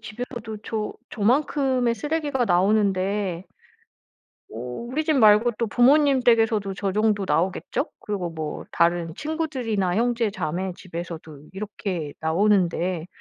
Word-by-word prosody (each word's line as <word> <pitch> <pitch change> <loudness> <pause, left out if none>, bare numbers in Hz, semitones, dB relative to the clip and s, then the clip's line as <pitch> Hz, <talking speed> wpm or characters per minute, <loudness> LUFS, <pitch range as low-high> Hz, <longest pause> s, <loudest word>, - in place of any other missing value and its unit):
집에서도 225 0 -6
저 215 -2 -3
저 - - -29 0.2
저만큼의 255 +1 +1
쓰레기가 295 -3 -1
나오는데 195 -1 +1 1.0
어 - - -10
우리 235 - -4
집 310 - +2
말고 220 0 +5
또 230 - 0
부모님 270 +4 +4
댁에서도 225 -4 +2
저 195 -1 -2
정도 210 -1 +1
나오겠죠? 180 +2 0
그리고 195 -5 -3
뭐 155 -2 -5
다른 170 -1 +1
친구들이나 255 - -2
형제 235 -1 +1
자매 185 0 -3
집에서도 165 -4 -8
이렇게 190 -6 -4
나오는데, 175 -1 +1
210 Hz, 295 characters per minute, -24 LUFS, 180-240 Hz, 1.0 s, 말고